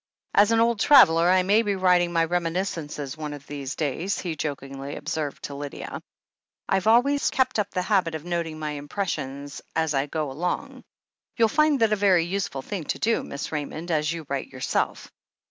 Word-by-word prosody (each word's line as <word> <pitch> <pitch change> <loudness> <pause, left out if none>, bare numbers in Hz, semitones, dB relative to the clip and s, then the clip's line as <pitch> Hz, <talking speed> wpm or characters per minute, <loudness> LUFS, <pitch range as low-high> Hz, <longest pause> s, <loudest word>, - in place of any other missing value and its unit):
"As 205 +2 +5
an 225 - +4
old 230 -1 +2
traveller, 175 - +6
I 185 0 +4
may 205 +4 +4
be 205 -3 -1
writing 180 -2 +3
my 165 -1 +2
reminis 175 +3 -1
cences 145 -3 -6
one 150 -1 -5
of 145 -1 -10
these 140 -2 -5
days," 160 +6 -1
he 170 -3 -3
jokingly 140 -2 -5
observed 150 -3 -4
to 140 - -5
Lydia. 140 0 -6 0.7
"I've 190 +1 +1
always 265 +6 +4
kept 255 -4 +1
up 205 - 0
the 180 - -2
habit 180 -5 +1
of 160 +1 -7
noting 170 -3 -2
my 155 -1 -3
impressions 145 -2 -4
as 160 -2 +1
I 135 +1 0
go 150 -2 -3
along. 175 +6 -3 0.5
You'll 225 -2 +4
find 305 0 +3
that 220 -1 +4
a - - +4
very 190 -5 +3
use 195 +2 -1
ful 135 -1 -7
thing 190 -3 -5
to - - -2
do. 230 +2 +1
Miss 140 - -6
Raymond, 155 +3 -4
as 155 -1 +1
you 165 -2 -5
write 140 -1 -3
yourself." 130 - -2
165 Hz, 195 wpm, -25 LUFS, 145-200 Hz, 0.7 s, traveller